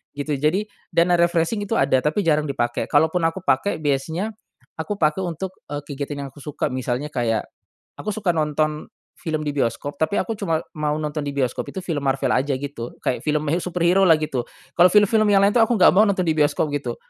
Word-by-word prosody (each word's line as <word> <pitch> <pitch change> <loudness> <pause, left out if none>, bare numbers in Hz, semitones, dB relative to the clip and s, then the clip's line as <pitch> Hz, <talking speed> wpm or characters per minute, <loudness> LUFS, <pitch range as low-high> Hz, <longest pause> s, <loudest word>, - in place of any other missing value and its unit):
gitu. 145 0 -3
Jadi 190 +9 0 0.2
dana 170 0 +2
refreshing 170 +5 +1
itu 225 - -1
ada 130 - +3
tapi 155 +9 0
jarang 155 -2 +2
dipake 120 -3 -2
kalaupun 160 +3 +2
aku 170 +3 -5
pake 185 +6 +1
biasanya, 160 +9 -1 0.5
aku 205 +6 -3
pake 155 -1 +1
untuk, 180 0 -4 0.2
eee, 145 0 -5
kegiatan 145 0 -5
yang - - -5
aku 145 - -16
suka 145 -2 -3
misalnya 130 +3 -3
kayak, 115 -4 0 0.6
aku - - -9
suka 205 -5 +1
nonton 155 -1 -1 0.3
film 155 -2 -3
di 150 - -2
bioskop 140 +2 -2
tapi 160 +5 0
aku 225 -2 -4
cuma 165 -6 -1 0.2
mau 150 -1 0
nonton 150 0 -3
di 145 - -3
bioskop 130 -3 -1
itu 190 - -6
film 150 -6 -3
Marvel 135 0 +1
aja 135 +3 +1
gitu 130 -3 -6
kayak 125 - -2
film 150 -1 0
he 165 - +2
superhero 180 +2 +2
lah 170 - +7
gitu. 140 -5 -3 0.3
Kalau 175 +1 +8
film-film 215 +1 +4
yang 195 - +5
lain 200 +1 +4
tuh 230 - +5
aku 240 - 0
nggak 185 - +7
mau 210 - +6
nonton 200 -3 +1
di 160 - +2
bioskop 150 +1 +2
gitu. 125 -5 -3
155 Hz, 205 wpm, -22 LUFS, 145-180 Hz, 0.6 s, Kalau